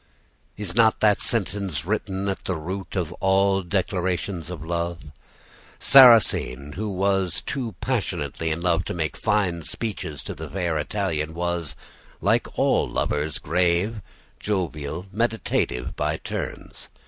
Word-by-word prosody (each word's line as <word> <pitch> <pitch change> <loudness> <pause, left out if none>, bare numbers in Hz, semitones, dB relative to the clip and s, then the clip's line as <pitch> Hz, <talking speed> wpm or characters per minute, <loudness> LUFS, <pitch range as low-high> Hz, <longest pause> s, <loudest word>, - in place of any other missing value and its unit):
"Is 100 -4 -3
not 110 -1 +4
that 105 -2 +4
sentence 100 - -1
written 95 +1 -2
at 95 - -3
the 95 - -1
root 90 +3 -5
of 90 -3 -1
all 95 0 +3
declarations 90 -1 -1
of 80 -4 -6
love? 85 -2 -3 0.7
Sarrasine, 115 - +6
who 105 +3 -3
was 95 -2 0
too 125 -6 -3
passionately 85 - -1
in 80 +1 -2
love 90 -1 +2
to - - -4
make 80 -3 -2
fine 100 -6 +1
speeches 80 -6 -4
to - - -5
the - - -8
fair 90 -4 -1
Italian, 80 -3 -2
was, 85 -5 -2 0.4
like - - +1
all - - +2
lovers, 75 +1 -1
grave, 90 +6 +1 0.4
jovial, 85 -4 -2
meditative, 110 - -1
by - - -1
turns. - - -6
90 Hz, 130 wpm, -24 LUFS, 80-100 Hz, 0.7 s, Sarrasine